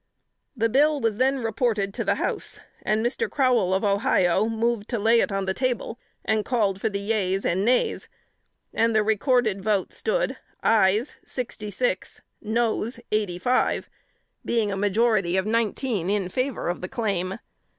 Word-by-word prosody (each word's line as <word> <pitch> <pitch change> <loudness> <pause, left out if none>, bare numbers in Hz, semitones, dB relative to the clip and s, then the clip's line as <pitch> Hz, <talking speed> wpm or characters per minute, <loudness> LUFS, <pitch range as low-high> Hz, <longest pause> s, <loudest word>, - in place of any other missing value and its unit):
The 230 0 +2
bill 290 +5 +3
was 225 -4 0
then 265 +1 +1
reported 220 -3 0
to - - -2
the - - +1
House, - - -2 0.2
and 215 +2 0
Mr. 240 - -1
Crowell, 250 -9 +2
of 190 +2 +1
Ohio, 200 -2 +2
moved 225 -1 -1
to 240 - -1
lay 225 +2 +4
it - - +1
on 195 0 -1
the 190 - 0
table, 250 0 -2 0.3
and 220 -1 +1
called 205 -6 0
for 220 - +1
the 200 - -3
yeas 200 -2 -1
and 185 +3 +1
nays; 245 +3 +1 0.7
and 230 0 +2
the 215 - +4
recorded 220 -1 +1
vote 205 -3 0
stood, - - -1 0.3
ayes 215 +3 +3
sixty 230 -4 -5
six, - - -2 0.2
noes 230 +1 -1
eighty 210 -5 0
five 250 +8 0 0.5
being 225 -3 0
a - - -2
majority 205 -2 +2
of 190 - +1
nineteen 220 -3 0
in 200 -3 0
favor 255 +5 -2
of 175 - -2
the 180 - -5
claim. 195 -4 -2
220 Hz, 160 wpm, -25 LUFS, 195-240 Hz, 0.7 s, lay